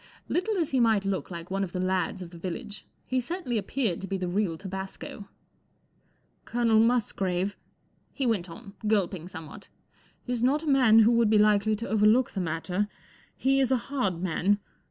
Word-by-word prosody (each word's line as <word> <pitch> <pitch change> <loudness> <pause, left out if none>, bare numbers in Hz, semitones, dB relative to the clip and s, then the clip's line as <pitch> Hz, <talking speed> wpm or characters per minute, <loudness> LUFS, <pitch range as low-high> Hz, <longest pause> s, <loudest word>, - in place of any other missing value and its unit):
Little 410 +4 0
as 330 -4 0
he 265 - +2
might 220 -4 +3
look 195 -1 -2
like 170 0 -8
one 195 +1 0
of 180 - -5
the 180 - -2
lads 185 0 -1
of 170 - -11
the 170 - -11
village, 205 +5 -6 0.2
he 255 0 0
certainly 250 - -2
appeared 215 -4 -2
to 195 - -5
be 195 - -2
the 185 -1 -3
real 180 -2 0
tabasco. 190 +2 -7 1.1
"Colonel 230 -2 +2
Musgrave," 200 -5 +1 0.6
he 270 - -2
went 200 -7 0
on, 195 +4 -11
gulping 190 -5 0
somewhat, 160 -3 -10 0.6
44 250 - -2
is 240 - -2
not 280 +6 +2
a - - -6
man 255 -6 +5
who 225 +1 +7
would 235 -2 +3
be 215 - +5
likely 210 0 +4
to 230 +3 -5
overlook 220 +4 +3
the 195 - -3
matter. 180 +4 -1 0.5
He 270 +1 +2
is 265 -1 +2
a 260 - +4
hard 195 -11 -1
man. 185 +3 +2
210 Hz, 185 wpm, -27 LUFS, 185-240 Hz, 1.1 s, who